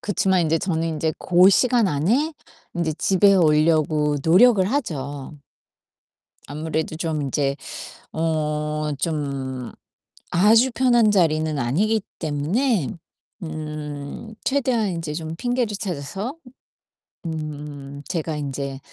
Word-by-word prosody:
그치만 190 Hz, -2 st, +1 dB
인제 165 Hz, 0 st, +1 dB
저는 165 Hz, -2 st, -1 dB
인제 160 Hz, 0 st, -1 dB
고 180 Hz, +2 st, +5 dB
시간 240 Hz, +1 st, +4 dB
안에 225 Hz, -, +1 dB, 0.4 s
인제 165 Hz, -3 st, -1 dB
집에 195 Hz, +1 st, +4 dB
오려고 155 Hz, -2 st, +3 dB
노력을 190 Hz, +4 st, +6 dB
하죠. 150 Hz, -, -3 dB, 1.1 s
아무래도 155 Hz, +2 st, -3 dB
좀 160 Hz, -3 st, -2 dB
인제 140 Hz, 0 st, 0 dB, 0.6 s
어 150 Hz, -1 st, -1 dB
좀 135 Hz, -5 st, -3 dB, 0.6 s
아주 220 Hz, +8 st, +5 dB
편한 240 Hz, -4 st, +4 dB
자리는 155 Hz, -5 st, +2 dB
아니기 200 Hz, -, +1 dB, 0.2 s
때문에 165 Hz, -, 0 dB, 0.5 s
음 150 Hz, +4 st, -6 dB
최대한 255 Hz, -6 st, +1 dB
인제 165 Hz, -4 st, -4 dB
좀 160 Hz, 0 st, -5 dB
핑계를 245 Hz, -2 st, -1 dB
찾아서 195 Hz, -, -4 dB, 0.9 s
음 150 Hz, -3 st, -6 dB
제가 160 Hz, -2 st, -2 dB
인제 140 Hz, -1 st, -4 dB
160 Hz, 210 characters per minute, -23 LUFS, 150-200 Hz, 1.1 s, 노력을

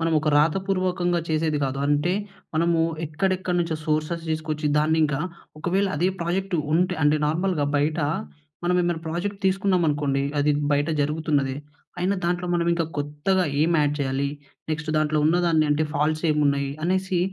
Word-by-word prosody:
మనం 165 Hz, 0 st, +1 dB
ఒక 155 Hz, -, -1 dB
రాతపూర్వకంగా 180 Hz, +1 st, +1 dB
చేసేది 155 Hz, -1 st, 0 dB
గాదు. 135 Hz, 0 st, -2 dB
అంటే 145 Hz, +4 st, +2 dB, 0.4 s
మనము 165 Hz, +1 st, +2 dB, 0.3 s
ఎక్కడెక్కడ 185 Hz, +3 st, -1 dB
నుంచో 165 Hz, -2 st, -1 dB
సోర్సెస్ 155 Hz, +2 st, -1 dB
దీసుకొచ్చి 155 Hz, -1 st, -2 dB
దాన్నింకా 155 Hz, -2 st, +2 dB, 0.4 s
ఒకవేళ 185 Hz, +5 st, +1 dB
అదే 175 Hz, +5 st, +2 dB
ప్రాజెక్ట్ 180 Hz, +2 st, -1 dB, 0.2 s
ఉంటే 180 Hz, +3 st, +2 dB
అంటే 150 Hz, +1 st, +4 dB
నార్మల్‌గా 165 Hz, -1 st, 0 dB
బయటా 150 Hz, +1 st, +1 dB, 0.6 s
మనం 180 Hz, +1 st, +2 dB
ఏమైనా 175 Hz, -2 st, -1 dB
ప్రాజెక్ట్ 195 Hz, +5 st, -3 dB
తీసుకున్నామనుకోండి 165 Hz, -8 st, +1 dB, 0.2 s
అది 145 Hz, +1 st, +3 dB, 0.2 s
బయట 145 Hz, +2 st, +1 dB
జరుగుతున్నదే 145 Hz, -2 st, 0 dB, 0.4 s
అయినా 185 Hz, +3 st, +1 dB
దాంట్లో 175 Hz, +1 st, 0 dB
మనం 170 Hz, -1 st, +1 dB
ఇంకా 170 Hz, -1 st, 0 dB
కొత్తగా 150 Hz, +6 st, 0 dB, 0.2 s
ఏం 160 Hz, +3 st, +3 dB
యాడ్ 145 Hz, 0 st, +1 dB
చేయాలి? 135 Hz, 0 st, 0 dB, 0.4 s
నెక్స్ట్ 155 Hz, 0 st, -2 dB
దాంట్లో 155 Hz, 0 st, +2 dB
ఉన్నదాన్ని 165 Hz, -2 st, +3 dB
అంటే 150 Hz, +2 st, +2 dB
ఫాల్ట్సేమున్నాయి? 150 Hz, -2 st, +1 dB
అనేసి 185 Hz, 0 st, 0 dB
160 Hz, 140 wpm, -24 LUFS, 150-175 Hz, 0.6 s, అంటే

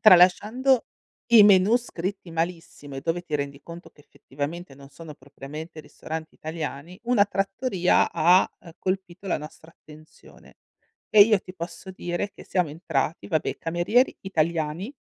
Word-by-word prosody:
Tralasciando 215 Hz, +7 st, +5 dB, 0.5 s
i 220 Hz, -3 st, +10 dB
menù 200 Hz, +3 st, +6 dB
scritti 190 Hz, -6 st, -5 dB
malissimo 165 Hz, -4 st, -4 dB
e -, -, -4 dB
dove 170 Hz, +4 st, -2 dB
ti 155 Hz, -, -6 dB
rendi 140 Hz, 0 st, -5 dB
conto 170 Hz, +1 st, -11 dB
che 145 Hz, -, -22 dB
effettivamente 145 Hz, +2 st, -7 dB
non 140 Hz, 0 st, -14 dB
sono 150 Hz, +1 st, -11 dB
propriamente 150 Hz, +4 st, -10 dB
ristoranti 160 Hz, +1 st, -8 dB
italiani, 160 Hz, +1 st, -6 dB
una 235 Hz, -4 st, +4 dB
trattoria 195 Hz, -1 st, +1 dB
ha, 180 Hz, +4 st, +4 dB
uhm, 170 Hz, -, -13 dB
colpito 185 Hz, 0 st, -4 dB
la -, -, 0 dB
nostra 155 Hz, +2 st, -12 dB
attenzione. 155 Hz, -1 st, -18 dB, 0.5 s
E 210 Hz, -, +7 dB
io 210 Hz, -1 st, +6 dB
ti 185 Hz, -, -12 dB
posso 175 Hz, +2 st, -8 dB
dire 175 Hz, +2 st, -4 dB
che -, -, -14 dB
siamo 180 Hz, -5 st, 0 dB
entrati, 155 Hz, -1 st, -2 dB
vabbè, 160 Hz, -5 st, -1 dB
camerieri 175 Hz, +10 st, +1 dB
italiani. 170 Hz, -, -2 dB
170 Hz, 145 wpm, -25 LUFS, 155-195 Hz, 0.5 s, i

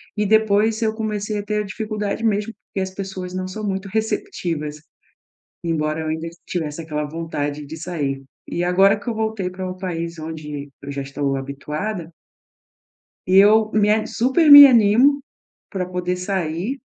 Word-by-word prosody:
e 210 Hz, -1 st, 0 dB
depois 220 Hz, +1 st, +3 dB
eu 220 Hz, -1 st, +1 dB
comecei 215 Hz, -1 st, -3 dB
a 205 Hz, -, -3 dB
ter 210 Hz, 0 st, -1 dB
a -, -, -8 dB
dificuldade 210 Hz, +1 st, -4 dB
mesmo, 210 Hz, 0 st, 0 dB
porque 200 Hz, -1 st, -8 dB
as 190 Hz, 0 st, -3 dB
pessoas 190 Hz, -2 st, -6 dB
não 185 Hz, 0 st, -3 dB
são 210 Hz, +3 st, -5 dB
muito 195 Hz, 0 st, -3 dB
receptivas, 175 Hz, -, -3 dB, 0.8 s
embora 155 Hz, -1 st, -1 dB
eu 160 Hz, -, -4 dB
ainda 160 Hz, +1 st, -3 dB, 0.2 s
tivesse 160 Hz, -3 st, -3 dB
aquela 150 Hz, -2 st, -3 dB
vontade 150 Hz, -2 st, -4 dB
de 150 Hz, -, -8 dB
sair. 150 Hz, -5 st, -3 dB, 0.2 s
E 175 Hz, -, -2 dB
agora 195 Hz, +3 st, +4 dB
que 205 Hz, -, -5 dB
eu -, -, -1 dB
voltei 220 Hz, -4 st, -2 dB
para 185 Hz, 0 st, -5 dB
um 185 Hz, -, -7 dB
país 170 Hz, -2 st, -4 dB
onde 150 Hz, -2 st, -6 dB
eu 140 Hz, -, -7 dB
já 140 Hz, 0 st, -4 dB
estou 140 Hz, 0 st, -2 dB
habituada 150 Hz, +7 st, -5 dB, 1.2 s
eu 210 Hz, +3 st, +5 dB
me 210 Hz, -1 st, +3 dB
a 215 Hz, 0 st, +2 dB
super 265 Hz, +7 st, +2 dB
me 285 Hz, 0 st, +13 dB
animo 250 Hz, +3 st, +5 dB, 0.5 s
para 190 Hz, -3 st, -3 dB
poder 180 Hz, 0 st, -2 dB
sair 180 Hz, -, -2 dB
185 Hz, 165 wpm, -21 LUFS, 160-215 Hz, 1.2 s, me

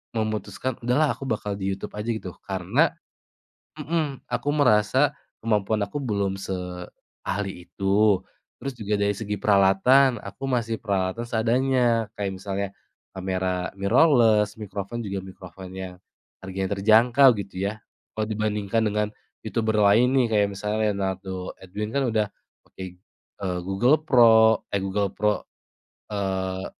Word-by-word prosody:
memutuskan, 110 Hz, +3 st, -2 dB
"Udahlah 140 Hz, +5 st, +3 dB
aku 135 Hz, -, -7 dB
bakal 105 Hz, -4 st, -2 dB
di 95 Hz, 0 st, -1 dB
YouTube 95 Hz, -, -7 dB
aja," 105 Hz, +3 st, -4 dB
gitu. 110 Hz, -4 st, -5 dB, 0.2 s
Karena 95 Hz, -3 st, +1 dB, 0.9 s
mmm, 150 Hz, -2 st, -2 dB
aku 145 Hz, -, -2 dB
merasa 130 Hz, +2 st, +3 dB, 0.3 s
kemampuan 110 Hz, -1 st, +1 dB
aku 100 Hz, +7 st, -4 dB
belum 100 Hz, -5 st, -1 dB
seahli 90 Hz, +1 st, -6 dB
itu. 100 Hz, +2 st, +2 dB, 0.4 s
Terus 135 Hz, -1 st, -4 dB
juga 105 Hz, -2 st, -2 dB
dari 100 Hz, 0 st, +1 dB
segi 105 Hz, -1 st, -3 dB
peralatan 105 Hz, +6 st, +4 dB
aku 100 Hz, +7 st, -9 dB
masih 115 Hz, -3 st, -1 dB
peralatan 100 Hz, +1 st, -1 dB
seadanya 120 Hz, -1 st, +1 dB
kayak 100 Hz, -2 st, -3 dB
misalnya 100 Hz, +1 st, -3 dB, 0.5 s
kamera 95 Hz, -1 st, -2 dB
mirrorless, 110 Hz, -1 st, +4 dB
microphone 100 Hz, +3 st, -5 dB
juga 95 Hz, -3 st, -4 dB
microphone 95 Hz, 0 st, -11 dB
yang 95 Hz, -1 st, -6 dB, 0.5 s
harganya 95 Hz, +1 st, -3 dB
terjangkau 120 Hz, +6 st, +6 dB
gitu 95 Hz, -1 st, -5 dB
ya. 110 Hz, +2 st, -4 dB, 0.3 s
Kalau 110 Hz, 0 st, -1 dB
dibandingkan 110 Hz, 0 st, -1 dB
dengan 105 Hz, 0 st, 0 dB, 0.3 s
youtuber 110 Hz, -2 st, 0 dB
lain 115 Hz, +6 st, +5 dB
nih 130 Hz, -3 st, +4 dB
kayak 105 Hz, -1 st, +4 dB
misalnya 105 Hz, +2 st, -3 dB
Leonardo 95 Hz, -1 st, -4 dB
Edwin 100 Hz, +3 st, -5 dB
kan 140 Hz, -1 st, +1 dB
udah 110 Hz, -1 st, +2 dB, 0.4 s
pakai, 95 Hz, -1 st, -9 dB, 0.4 s
eee, 90 Hz, -2 st, -2 dB
Google 100 Hz, +10 st, +3 dB
Pro 110 Hz, -5 st, +6 dB
eh, 100 Hz, -, +1 dB
Google 100 Hz, +1 st, 0 dB
Pro, 105 Hz, 0 st, +1 dB, 0.7 s
eee, 95 Hz, -2 st, -2 dB
105 Hz, 130 wpm, -25 LUFS, 95-115 Hz, 0.9 s, terjangkau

